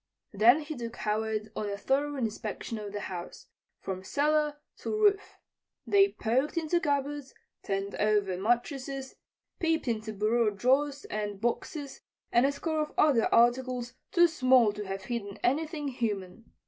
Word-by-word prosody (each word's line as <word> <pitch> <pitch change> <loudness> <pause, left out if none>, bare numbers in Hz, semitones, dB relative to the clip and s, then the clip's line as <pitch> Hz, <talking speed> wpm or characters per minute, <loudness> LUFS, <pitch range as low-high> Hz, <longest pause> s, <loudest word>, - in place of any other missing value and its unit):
Then 235 +9 +6
he 305 +1 -6
took 235 -2 -6
Howard 215 0 -2
on 210 - -2
a 200 - -3
thorough 285 +6 0
inspection 225 -2 -4
of 205 -1 -6
the 205 0 -4
house, 175 -3 -7 0.4
from 185 -1 -5
cellar 300 +5 +1 0.2
to - - -6
roof. 415 -2 +2 0.5
They 395 0 +4
poked 260 +8 0
into 335 +1 +1
cupboards, 285 -2 -2 0.3
turned 195 0 -2
over 205 -3 +1
mattresses, 265 - -1 0.5
peeped 325 -4 0
into 220 -2 -2
bureau 215 +2 +2
drawers 270 +7 +1
and 205 -2 -4
boxes 270 +5 -3 0.3
and 240 +3 +5
a - - +1
score 315 +2 -2
of 300 - -4
other 270 -7 +4
articles 245 +1 +2 0.2
too 345 -2 +6
small 255 -8 +4
to 210 -1 -6
have 195 0 -4
hidden 205 -2 -4
anything 300 +2 0
human. 215 -4 -3
240 Hz, 150 wpm, -29 LUFS, 210-290 Hz, 0.5 s, Then